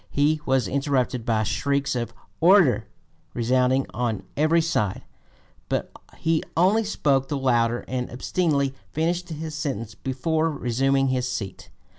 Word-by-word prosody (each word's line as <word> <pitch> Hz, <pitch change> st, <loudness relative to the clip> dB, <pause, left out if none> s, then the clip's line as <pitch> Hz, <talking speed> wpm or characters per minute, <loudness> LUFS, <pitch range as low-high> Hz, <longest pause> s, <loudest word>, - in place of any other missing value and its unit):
He 150 Hz, +2 st, +2 dB
was 130 Hz, -5 st, +2 dB
interrupted 130 Hz, -2 st, 0 dB
by 110 Hz, -2 st, +2 dB
shrieks 140 Hz, +5 st, 0 dB
of 120 Hz, -1 st, -2 dB, 0.3 s
"order" 160 Hz, -, +5 dB, 0.5 s
resounding 130 Hz, +2 st, +2 dB
on 115 Hz, -3 st, -2 dB
every 155 Hz, +3 st, +3 dB
side; 160 Hz, -, 0 dB, 0.7 s
but -, -, -1 dB, 0.3 s
he 160 Hz, -1 st, +1 dB, 0.2 s
only 195 Hz, +6 st, +4 dB
spoke 140 Hz, -10 st, +1 dB
the 145 Hz, -, -2 dB
louder 120 Hz, -3 st, +1 dB
and 125 Hz, -1 st, -3 dB
obstinately 140 Hz, +1 st, 0 dB, 0.2 s
finished 170 Hz, +3 st, -1 dB
his 160 Hz, 0 st, -5 dB
sentence 130 Hz, -8 st, -3 dB
before 155 Hz, +7 st, -1 dB
resuming 135 Hz, 0 st, +1 dB
his 125 Hz, -1 st, 0 dB
seat. 95 Hz, -3 st, -6 dB
135 Hz, 130 wpm, -24 LUFS, 125-155 Hz, 0.7 s, order